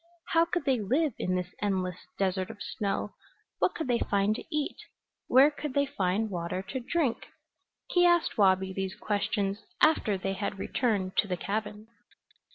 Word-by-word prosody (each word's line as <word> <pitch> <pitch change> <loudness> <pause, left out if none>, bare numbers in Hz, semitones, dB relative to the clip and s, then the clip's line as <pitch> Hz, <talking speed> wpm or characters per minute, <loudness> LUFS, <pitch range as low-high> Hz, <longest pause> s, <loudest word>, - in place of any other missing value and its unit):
How 330 0 +4
could 350 +1 -2
they 265 -4 +2
live 270 +7 +1
in 185 - 0
this 180 0 -3
endless 185 -3 -2
desert 190 -1 0
of 225 - -8
snow? 205 0 -2 0.5
What - - +2
could 320 - -3
they 240 -2 +2
find 200 +1 +1
to - - -6
eat? 300 -1 -2 0.5
Where 270 +4 +6
could 295 -2 -6
they 280 0 +3
find 210 -5 -1
water 175 +1 -3
to 260 - -2
drink? 265 -1 -1 0.6
He 355 - +4
asked 345 -1 +4
Wabi 190 -2 +3
these 190 0 -3
questions 205 -1 -1 0.2
after 225 -10 +3
they 195 +1 -2
had 200 +1 -3
returned 195 -3 -1
to 205 - +3
the 180 -2 -2
cabin. 210 +2 -4
210 Hz, 165 wpm, -29 LUFS, 190-265 Hz, 0.6 s, Where